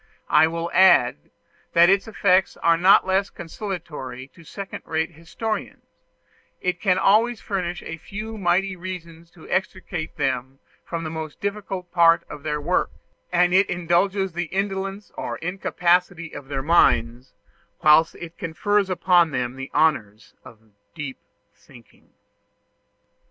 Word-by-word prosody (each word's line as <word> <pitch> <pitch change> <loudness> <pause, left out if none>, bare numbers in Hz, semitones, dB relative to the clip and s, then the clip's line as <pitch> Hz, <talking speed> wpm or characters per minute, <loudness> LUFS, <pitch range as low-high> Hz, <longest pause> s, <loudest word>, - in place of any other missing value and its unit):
I 160 - +6
will 165 +1 -4
add, 125 - +4 0.4
that 170 +1 +6
its 195 +3 +2
effects 190 -3 +2
are 170 0 +3
not 185 +4 +5
less 190 +1 +1
consolatory 160 - -7
to 165 +6 -18
second 195 +4 -8
rate 160 +1 -2
historians; 175 +7 -5 0.8
it 180 -1 -2
can 185 -3 +2
always 220 +4 +3
furnish 180 -3 -4
a 165 - -6
few 215 +6 -7
mighty 190 0 +1
reasons 170 -2 -8
to 165 - -15
extricate 175 -3 -3
them 130 0 -2 0.3
from 165 -1 -5
the 155 - -5
most 160 -1 -6
difficult 200 -3 -4
part 170 -2 +5
of 150 - -8
their 150 0 -2
work, 170 +5 0 0.4
and 180 0 +3
it 190 +2 +4
indulges 180 +3 0
the 175 +1 -2
indolence 195 +2 -3
or - - -4
incapacity 180 -1 0
of 140 -2 -9
their 135 -1 -3
minds, 125 -6 +2 0.5
whilst 155 +2 +5
it 170 -1 -10
confers 200 +5 0
upon 180 -2 +3
them 125 -3 -3
the 135 +1 -7
honors 110 -10 0
of 110 -1 -17 0.2
deep 145 -5 -6 0.3
thinking. 120 -5 -20
170 Hz, 135 wpm, -23 LUFS, 155-190 Hz, 0.8 s, I